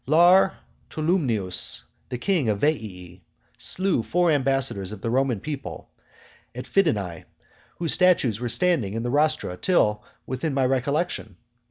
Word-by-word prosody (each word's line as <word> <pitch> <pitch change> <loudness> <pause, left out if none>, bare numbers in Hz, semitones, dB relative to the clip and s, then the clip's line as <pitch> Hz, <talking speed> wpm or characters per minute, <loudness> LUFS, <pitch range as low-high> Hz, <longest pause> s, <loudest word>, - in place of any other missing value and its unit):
II. - - -5
Lar 180 +4 +6 0.3
Tolumnius, 135 - -1 0.3
the 125 - -3
king 160 - 0
of 105 -2 0
Veii, 95 - -2 0.4
slew 185 -8 0
four 175 +8 +1
ambassadors 135 -8 +1
of 105 -2 -8
the 115 - -2
Roman 130 -3 +1
people, 145 +1 -7 0.6
at 125 - -6
Fidenae, 105 - 0 0.5
whose 165 -2 -1
statues 165 - +3
were 120 -1 -3
standing 130 - +1
in 115 - -2
the 120 - -2
rostra 150 -9 +1
till 105 - +2 0.2
within 135 +3 -3
my 135 -1 +2
recollection. 135 - -1
135 Hz, 140 wpm, -24 LUFS, 110-160 Hz, 0.6 s, Lar